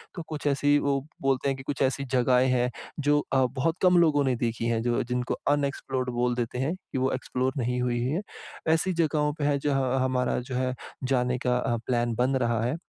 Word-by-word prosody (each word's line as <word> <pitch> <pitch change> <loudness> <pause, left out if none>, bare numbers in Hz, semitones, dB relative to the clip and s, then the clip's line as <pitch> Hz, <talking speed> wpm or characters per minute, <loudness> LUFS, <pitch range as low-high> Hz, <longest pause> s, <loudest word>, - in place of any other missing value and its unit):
तो 170 - -4
कुछ 150 -2 -6
ऐसी 145 +1 +3
वो 140 -1 +1 0.2
बोलते 135 0 +1
हैं 135 - -1
कि 130 - -9
कुछ 140 +1 -4
ऐसी 135 +1 +1
जगहें 125 0 +4
हैं 125 0 +2 0.3
जो 145 0 +3
अ, 130 -1 +4
बहुत 140 +6 -1
कम 180 -1 +5
लोगों 155 -4 +4
ने 130 - +2
देखी 115 -1 -2
हैं, 115 -1 +1
जो 120 +2 +1
जिनको 125 +1 -2 0.2
अनएक्सप्लोर्ड 135 -3 -1
बोल 125 0 +1
देते 120 0 -3
हैं, 140 +6 0
कि 185 - -8
वो 130 +1 +1
एक्सप्लोर 130 0 -1
नहीं 125 0 -1
हुई 120 -1 0
हैं। 155 +9 0 0.5
ऐसी 180 +3 +1
जगहों 150 -3 +1
पे - - -1
है, 145 -1 +2
जहाँ 135 -2 +1
हमारा 125 -1 0
जो 125 +1 -6
है, 130 0 0 0.3
जाने 125 -1 +1
का 125 0 +3
अ, 120 -1 0
प्लान 120 -2 0
बन 125 +3 +1
रहा 120 -3 +1
है। 125 +6 0
130 Hz, 215 wpm, -27 LUFS, 125-145 Hz, 0.5 s, कम